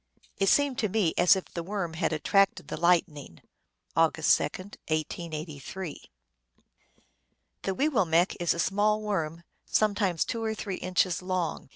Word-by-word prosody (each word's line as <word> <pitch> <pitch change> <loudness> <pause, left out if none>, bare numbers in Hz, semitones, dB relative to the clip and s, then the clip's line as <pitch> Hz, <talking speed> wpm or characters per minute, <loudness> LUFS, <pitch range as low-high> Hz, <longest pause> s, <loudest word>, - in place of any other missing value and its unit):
It 195 - +3
seemed 285 -3 +2
to 215 - 0
me 190 -5 +1
as 175 +2 +6
if 190 - -4
the 170 - -6
worm 180 -2 -4
had 165 0 -1
attracted 195 +5 +1
the - - -3
lightning." 160 - +1 0.6
(Au 165 0 +5
gust 160 - +3
2, - - -1
1883.) 155 -1 -5 0.9
" - - -42
The 195 - -2
Weewillmekq 190 - +2
is 175 -1 +1
a - - -6
small 205 +4 +2
worm, 170 -5 -2 0.2
sometimes 200 -5 +1
two 230 -1 -3
or 220 0 -1
three 195 -3 -4
inches 185 -1 0
long. 180 -5 -3
180 Hz, 150 wpm, -28 LUFS, 165-205 Hz, 0.9 s, as